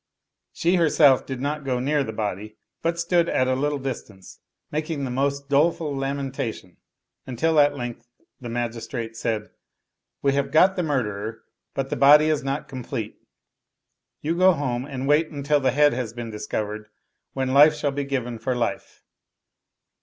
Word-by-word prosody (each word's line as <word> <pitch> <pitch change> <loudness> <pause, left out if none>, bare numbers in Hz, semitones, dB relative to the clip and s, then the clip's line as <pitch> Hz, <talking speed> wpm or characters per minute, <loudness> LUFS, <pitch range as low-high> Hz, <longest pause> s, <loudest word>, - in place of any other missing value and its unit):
She 175 +2 +1
herself 150 -5 +4
did 130 -2 -4
not 150 +1 -2
go 130 -2 -1
near 145 +3 +1
the 110 - -5
body, 105 -1 -4 0.2
but 165 0 0
stood 170 0 +2
at 130 - +1
a 130 - +2
little 145 +3 0
distance 110 -8 -7 0.3
making 155 -1 -2
the 130 - -3
most 140 +2 -1
doleful 150 +1 +1
lamentation; 135 -8 -4 0.5
until 155 +6 +1
at 145 0 +4
length 120 -1 -6 0.3
the 120 - -7
magistrate 115 0 -4
said, 110 -2 -3 0.3
" - - -59
We 140 -1 +3
have 140 0 0
got 185 +4 +5
the 180 - 0
murderer, 115 - -2 0.3
but 135 0 -3
the - - -1
body 150 +2 +7
is 155 -3 0
not 135 +2 -3
complete; 115 -4 -5 1.1
you 160 +3 -1
go 185 +1 +5
home 130 -5 -2
and 135 -2 -5
wait 150 +2 +3
until 145 0 0
the 130 -2 +2
head 145 +3 +4
has 120 -3 -3
been 120 -1 -6
discovered, 105 0 -4 0.5
when 130 -1 -1
life 150 +2 +7
shall 150 -1 -1
be 140 +1 -2
given 125 -4 -3
for 125 +3 -1
life." 120 -1 -3
135 Hz, 165 wpm, -24 LUFS, 120-150 Hz, 1.1 s, body